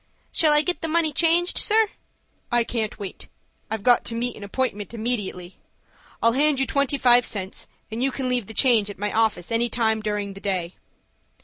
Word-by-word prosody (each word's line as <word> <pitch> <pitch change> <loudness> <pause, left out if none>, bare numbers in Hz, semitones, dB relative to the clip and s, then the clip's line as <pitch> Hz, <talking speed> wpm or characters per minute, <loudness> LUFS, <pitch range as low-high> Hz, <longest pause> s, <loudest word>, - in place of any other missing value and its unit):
"Shall 310 -2 +3
I 300 0 +4
get 360 +1 -1
the 325 - -2
money 320 -1 +1
changed, 340 +3 +3
sir?" 435 0 +3 0.6
"I 240 0 +3
can't 225 -2 -3
wait; 200 -2 -8 0.4
I've 220 -2 -4
got 245 0 +4
to 230 - -2
meet 240 +1 -2
an 210 - -10
appointment 210 0 -3
immediately. 205 -6 -3 0.6
I'll 230 - +5
hand 285 +2 +2
you 270 - +2
twenty 280 0 0
five 245 -2 +5
cents, 195 -4 -3 0.2
and 225 +2 -4
you 270 - +2
can 260 0 -3
leave 250 -5 -1
the 220 - -9
change 230 -5 +4
at 205 - -8
my 205 +2 -2
office 220 -4 0
any 235 +1 +1
time 220 -2 0
during 210 -2 -3
the 195 - -12
day." 185 -4 -2
235 Hz, 195 wpm, -23 LUFS, 210-270 Hz, 0.6 s, I'll